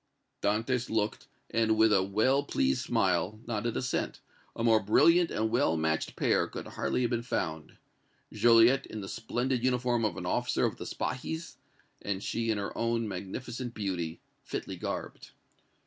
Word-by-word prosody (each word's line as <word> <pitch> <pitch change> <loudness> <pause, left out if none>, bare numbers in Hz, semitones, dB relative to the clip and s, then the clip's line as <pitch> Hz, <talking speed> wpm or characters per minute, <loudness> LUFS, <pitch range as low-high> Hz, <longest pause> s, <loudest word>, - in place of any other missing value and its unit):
Dantès 115 +4 0
looked 110 -1 -1 0.2
and, 110 -1 +2
with 110 -1 +5
a 95 - +5
well 110 +9 +2
pleased 65 - 0
smile, 105 +4 +1
nodded 115 0 -2
assent; 125 - -2 0.4
a 115 - -3
more 115 -2 +5
brilliant 165 - +4
and 110 +1 -1
well 80 -9 +2
matched 80 0 -1
pair - - +2
could - - -7
hardly - - -1
have 120 - 0
been 120 -1 0
found, 80 -9 -3 0.6
Joliette 120 +3 +5
in 110 - -6
the 95 - -6
splendid 120 +3 -2
uniform 125 -2 +1
of 105 -5 0
an - - -5
officer - - +1
of - - -2
the - - -7
Spahis, 160 +7 -4 0.4
and 100 -1 -3
she 115 0 -1
in 110 - +1
her 100 -1 -4
own 115 -1 0
magnificent 115 +6 -5
beauty, 90 -6 -3 0.2
fitly - - -5
garbed. - - -5
115 Hz, 160 wpm, -30 LUFS, 100-120 Hz, 0.6 s, with